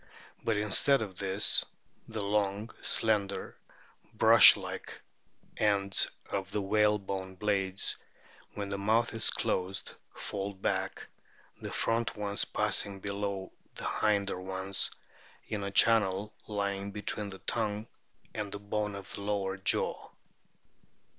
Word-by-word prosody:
But 115 Hz, -2 st, +1 dB
instead 110 Hz, +5 st, +3 dB
of 95 Hz, -4 st, -8 dB
this, 100 Hz, +1 st, +1 dB, 0.4 s
the 110 Hz, -2 st, -4 dB
long, 105 Hz, +1 st, 0 dB
slender, 105 Hz, -3 st, 0 dB, 0.6 s
brush -, -, +9 dB
like -, -, -7 dB, 0.6 s
ends 100 Hz, -2 st, +2 dB, 0.2 s
of 95 Hz, -1 st, -3 dB
the 105 Hz, -, -2 dB
whalebone 100 Hz, -2 st, 0 dB
blades, 95 Hz, -1 st, +1 dB, 0.6 s
when 100 Hz, -1 st, -4 dB
the 100 Hz, 0 st, -2 dB
mouth 110 Hz, +4 st, +2 dB
is 110 Hz, -1 st, +2 dB
closed, 95 Hz, 0 st, -2 dB, 0.2 s
fold 100 Hz, -1 st, -5 dB
back, -, -, -2 dB, 0.6 s
the -, -, -6 dB
front 115 Hz, 0 st, 0 dB
ones 100 Hz, -1 st, +1 dB
passing 100 Hz, -1 st, +2 dB
below 100 Hz, -1 st, -4 dB, 0.2 s
the -, -, -4 dB
hinder 100 Hz, -3 st, 0 dB
ones 95 Hz, +1 st, 0 dB, 0.6 s
in 105 Hz, -2 st, -3 dB
a 100 Hz, -, -2 dB
channel 105 Hz, -1 st, +3 dB
lying 100 Hz, -1 st, -2 dB
between 105 Hz, 0 st, -3 dB
the 95 Hz, -, -8 dB
tongue 105 Hz, 0 st, -2 dB, 0.5 s
and 105 Hz, -2 st, -4 dB
the 100 Hz, -, -5 dB
bone 105 Hz, 0 st, -3 dB
of 100 Hz, -1 st, -8 dB
the -, -, -6 dB
lower 100 Hz, -1 st, -1 dB
jaw. 95 Hz, -, -1 dB
100 Hz, 120 wpm, -30 LUFS, 95-105 Hz, 0.6 s, brush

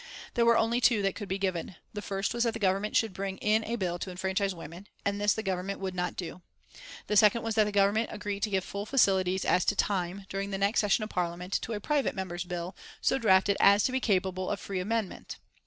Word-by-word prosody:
There 235 Hz, -1 st, +2 dB
were 235 Hz, -1 st, +6 dB
only 235 Hz, +2 st, +1 dB
two 230 Hz, -5 st, +4 dB
that 195 Hz, -, +1 dB
could 205 Hz, -3 st, -7 dB
be 190 Hz, -, -1 dB
given. 185 Hz, -2 st, -2 dB, 0.2 s
The 205 Hz, -, -4 dB
first 195 Hz, 0 st, -2 dB
was 240 Hz, 0 st, +1 dB
that 230 Hz, -2 st, +1 dB
the 225 Hz, -, -5 dB
Government 195 Hz, +1 st, 0 dB
should 220 Hz, -4 st, +2 dB
bring 195 Hz, 0 st, -4 dB
in 215 Hz, +1 st, +2 dB
a 230 Hz, -, -2 dB
bill 180 Hz, -5 st, -2 dB
to 190 Hz, -, -5 dB
enfranchise 190 Hz, +1 st, -1 dB
women, 170 Hz, +4 st, -10 dB, 0.2 s
and 200 Hz, 0 st, -1 dB
this 205 Hz, 0 st, +3 dB
the 220 Hz, -, -3 dB
Government 190 Hz, 0 st, -2 dB
would 190 Hz, -1 st, -3 dB
not 180 Hz, -1 st, -2 dB
do. 180 Hz, 0 st, -6 dB, 0.6 s
The 210 Hz, -, -1 dB
second 210 Hz, +2 st, +5 dB
was 225 Hz, 0 st, -1 dB
that 215 Hz, 0 st, +4 dB
the 210 Hz, -, -2 dB
Government 205 Hz, +3 st, +2 dB
agree 205 Hz, -1 st, -4 dB
to 215 Hz, -, -1 dB
give 190 Hz, -2 st, 0 dB
full 200 Hz, +2 st, -5 dB
facilities 190 Hz, -7 st, +2 dB
as 180 Hz, -, +3 dB
to 205 Hz, -, +2 dB
time, 190 Hz, -1 st, -1 dB
during 195 Hz, 0 st, -3 dB
the 195 Hz, -, -2 dB
next 200 Hz, +3 st, +2 dB
session 210 Hz, +1 st, +2 dB
of 215 Hz, -, -6 dB
Parliament, 180 Hz, +1 st, -2 dB
to 230 Hz, -, -4 dB
a 210 Hz, -, -3 dB
private 290 Hz, +6 st, 0 dB
member's 180 Hz, -2 st, -4 dB
bill, 175 Hz, +1 st, -5 dB, 0.2 s
so -, -, +1 dB
drafted 195 Hz, -2 st, +4 dB
as 200 Hz, +1 st, +6 dB
to -, -, +1 dB
be 260 Hz, -, 0 dB
capable 185 Hz, -5 st, 0 dB
of -, -, -2 dB
free 195 Hz, -2 st, -4 dB
amendment. 215 Hz, +1 st, -3 dB
200 Hz, 240 wpm, -29 LUFS, 185-215 Hz, 0.6 s, were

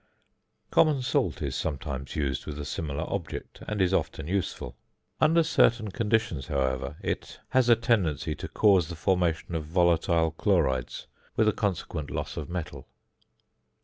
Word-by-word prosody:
Common 150 Hz, -5 st, +4 dB
salt 130 Hz, -, 0 dB
is 70 Hz, -2 st, -2 dB
sometimes 70 Hz, -3 st, -4 dB
used 70 Hz, -4 st, -2 dB
with 75 Hz, -, -5 dB
a 75 Hz, -, -5 dB
similar 75 Hz, 0 st, -3 dB
object, 100 Hz, -5 st, -5 dB
and 105 Hz, -1 st, -2 dB
is 95 Hz, 0 st, +2 dB
often -, -, -1 dB
useful. 85 Hz, -9 st, -3 dB, 0.4 s
Under 165 Hz, +2 st, +5 dB
certain 115 Hz, -9 st, +3 dB
conditions, 110 Hz, -, 0 dB
however, 70 Hz, -1 st, -1 dB
it -, -, -4 dB
has 130 Hz, -2 st, +3 dB
a 120 Hz, -, +8 dB
tendency 110 Hz, -, +1 dB
to -, -, -6 dB
cause 95 Hz, -6 st, +3 dB
the 85 Hz, -, -5 dB
formation 85 Hz, -1 st, 0 dB
of 80 Hz, -2 st, -1 dB
volatile 85 Hz, -1 st, +2 dB
chlorides 75 Hz, -, 0 dB, 0.3 s
with 110 Hz, -, +3 dB
a 105 Hz, -, +4 dB
consequent 85 Hz, -7 st, -2 dB
loss -, -, -4 dB
of 75 Hz, -, -5 dB
metal. 75 Hz, -6 st, -5 dB
85 Hz, 145 wpm, -28 LUFS, 75-105 Hz, 0.4 s, a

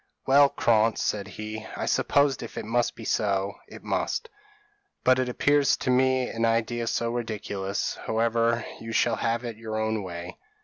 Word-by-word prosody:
p> -, -, -2 dB
"Well, 140 Hz, +1 st, +7 dB
Krantz," 115 Hz, -3 st, +2 dB
said 105 Hz, -1 st, -1 dB
he, 110 Hz, 0 st, -6 dB
"I -, -, -2 dB
suppose 140 Hz, -2 st, +2 dB
if 115 Hz, -, -8 dB
it -, -, -4 dB
must 120 Hz, +2 st, 0 dB
be 115 Hz, -, -9 dB
so, 100 Hz, -2 st, 0 dB
it -, -, -12 dB
must 465 Hz, -, -2 dB, 0.7 s
but 130 Hz, 0 st, +4 dB
it 130 Hz, -1 st, 0 dB
appears 145 Hz, +3 st, +3 dB
to 130 Hz, -, -1 dB
me 130 Hz, 0 st, +3 dB
an 115 Hz, -, -3 dB
idea 115 Hz, +1 st, +1 dB
so 115 Hz, 0 st, 0 dB
ridiculous 105 Hz, -4 st, -3 dB
however, 115 Hz, +1 st, +1 dB
you 115 Hz, 0 st, -6 dB
shall 115 Hz, 0 st, +2 dB
have 115 Hz, +1 st, -1 dB
your 110 Hz, -2 st, -5 dB
own 110 Hz, 0 st, 0 dB
way." 90 Hz, -1 st, -7 dB
115 Hz, 170 wpm, -26 LUFS, 110-120 Hz, 0.7 s, Well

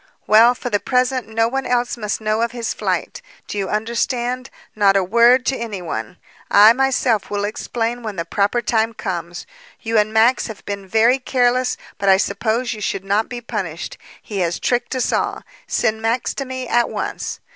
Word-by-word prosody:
"Well, 230 Hz, +3 st, +6 dB
for 245 Hz, 0 st, -5 dB
the 205 Hz, -, +2 dB
present, 255 Hz, 0 st, 0 dB
no 225 Hz, +1 st, +1 dB
one 270 Hz, +3 st, -2 dB
else 245 Hz, 0 st, 0 dB
must 210 Hz, -3 st, -3 dB
know 215 Hz, +1 st, 0 dB
of 235 Hz, 0 st, -1 dB
his 235 Hz, -2 st, -3 dB
flight. -, -, -2 dB, 0.3 s
Do -, -, -6 dB
you 195 Hz, -, -2 dB
understand? 240 Hz, +3 st, -1 dB, 0.3 s
Not 200 Hz, -2 st, +4 dB
a 195 Hz, -, +2 dB
word 235 Hz, +6 st, +4 dB
to 270 Hz, -, +1 dB
any 225 Hz, -6 st, -5 dB
one. 110 Hz, -10 st, -5 dB, 0.3 s
I, 210 Hz, +3 st, +8 dB
myself, 255 Hz, -4 st, +1 dB
will 205 Hz, 0 st, -2 dB
explain 230 Hz, +3 st, -3 dB
when 215 Hz, -3 st, -5 dB
the 170 Hz, -2 st, -3 dB
proper 205 Hz, +7 st, 0 dB
time 225 Hz, 0 st, +1 dB
comes. 175 Hz, -4 st, -5 dB, 0.3 s
You 225 Hz, -1 st, +1 dB
and 210 Hz, +1 st, +1 dB
Max 225 Hz, +3 st, +3 dB
have 220 Hz, -3 st, -10 dB
been 200 Hz, -1 st, -5 dB
very 230 Hz, +6 st, +3 dB
careless, 250 Hz, -1 st, +1 dB, 0.2 s
but 200 Hz, -, +1 dB
I 190 Hz, -, +7 dB
suppose 220 Hz, +5 st, -1 dB
you 215 Hz, -, -9 dB
should 195 Hz, -1 st, -2 dB
not 205 Hz, +3 st, +1 dB
be 245 Hz, -1 st, -6 dB
punished. 195 Hz, -8 st, -5 dB, 0.2 s
He 205 Hz, -2 st, -6 dB
has 175 Hz, -2 st, -1 dB
tricked 245 Hz, +1 st, -1 dB
us 255 Hz, -, 0 dB
all. -, -, -1 dB, 0.2 s
Send 220 Hz, -1 st, 0 dB
Max 230 Hz, +2 st, 0 dB
to 275 Hz, -, -4 dB
me 260 Hz, -1 st, -5 dB
at 240 Hz, 0 st, +2 dB
once." -, -, -4 dB
225 Hz, 190 wpm, -20 LUFS, 205-245 Hz, 0.3 s, I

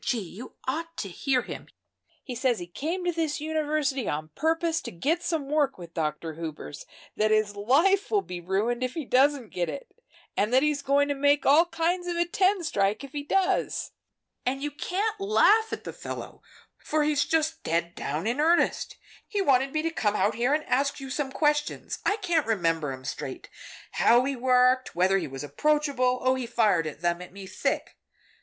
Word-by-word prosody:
Gee! 245 Hz, -, 0 dB
you 210 Hz, +4 st, -8 dB
ought 330 Hz, +5 st, -3 dB
to 195 Hz, -, -4 dB
hear 255 Hz, +7 st, 0 dB
him. -, -, -8 dB, 0.6 s
He 255 Hz, -, -6 dB
says 245 Hz, -1 st, +1 dB
he 175 Hz, -, -6 dB
came 320 Hz, -, -4 dB
to 350 Hz, -, +2 dB
this 320 Hz, -3 st, -1 dB
university 300 Hz, -4 st, -1 dB
on 155 Hz, +1 st, -3 dB
purpose 325 Hz, -, 0 dB
to -, -, -6 dB
get 295 Hz, -, 0 dB
some 320 Hz, -5 st, -2 dB
work 290 Hz, -2 st, +1 dB
with 170 Hz, -2 st, -11 dB
Dr. 160 Hz, 0 st, -2 dB
Hubers, 155 Hz, -, -7 dB, 0.3 s
that 215 Hz, 0 st, +2 dB
his 215 Hz, -1 st, +2 dB
life 315 Hz, -, +3 dB
will 410 Hz, -2 st, +2 dB
be 180 Hz, -1 st, -7 dB
ruined 205 Hz, +7 st, 0 dB
if 255 Hz, 0 st, -2 dB
he 320 Hz, -4 st, -3 dB
doesn't 265 Hz, -2 st, +2 dB
get 175 Hz, -1 st, -1 dB
it, -, -, -7 dB, 0.4 s
and 210 Hz, +3 st, +1 dB
that 260 Hz, +2 st, +4 dB
he's 300 Hz, -1 st, +1 dB
going 280 Hz, +1 st, +2 dB
to -, -, +2 dB
make 285 Hz, 0 st, +2 dB
all 310 Hz, +5 st, +6 dB
kinds 350 Hz, +2 st, -1 dB
of 350 Hz, -1 st, -2 dB
a 345 Hz, -, +2 dB
ten 375 Hz, +2 st, +2 dB
strike, 205 Hz, -5 st, 0 dB
if 275 Hz, -, -9 dB
he 290 Hz, -, -4 dB
does. 370 Hz, +6 st, 0 dB, 0.5 s
And 270 Hz, +2 st, -2 dB
you 295 Hz, -, -2 dB
can't 405 Hz, +8 st, -2 dB
laugh 435 Hz, +2 st, +4 dB
at -, -, -5 dB
the -, -, -6 dB
fellow, -, -, -7 dB, 0.4 s
for 305 Hz, 0 st, 0 dB
he's 295 Hz, -1 st, +2 dB
just 320 Hz, 0 st, 0 dB
dead 170 Hz, +1 st, -1 dB
down 150 Hz, +3 st, -3 dB
in 240 Hz, +5 st, -1 dB
earnest! 335 Hz, +3 st, +2 dB, 0.3 s
He 415 Hz, -, -2 dB
wanted 270 Hz, -7 st, +3 dB
me 310 Hz, +1 st, -1 dB
to 330 Hz, -, 0 dB
come 210 Hz, -9 st, 0 dB
out 205 Hz, +3 st, +2 dB
here 240 Hz, +4 st, 0 dB
and 305 Hz, +1 st, +2 dB
ask 280 Hz, +1 st, 0 dB
you 270 Hz, -1 st, -7 dB
some 270 Hz, 0 st, -2 dB
questions 295 Hz, 0 st, 0 dB
I 410 Hz, -, +2 dB
can't 345 Hz, -, 0 dB
remember 165 Hz, -9 st, 0 dB
'em 130 Hz, 0 st, -8 dB
straight. -, -, -6 dB, 0.4 s
How 240 Hz, +2 st, +4 dB
he 275 Hz, 0 st, -1 dB
worked 255 Hz, -1 st, +3 dB
whether 190 Hz, +2 st, +3 dB
he 165 Hz, -, -4 dB
was 135 Hz, +1 st, -7 dB
approachable. 280 Hz, -, +1 dB
Oh, 255 Hz, 0 st, +4 dB
he 260 Hz, -2 st, -3 dB
fired 210 Hz, -8 st, +2 dB, 0.2 s
them 175 Hz, 0 st, 0 dB
at 180 Hz, -, -10 dB
me 195 Hz, +1 st, -9 dB
thick. -, -, -2 dB
270 Hz, 195 wpm, -27 LUFS, 205-315 Hz, 0.6 s, all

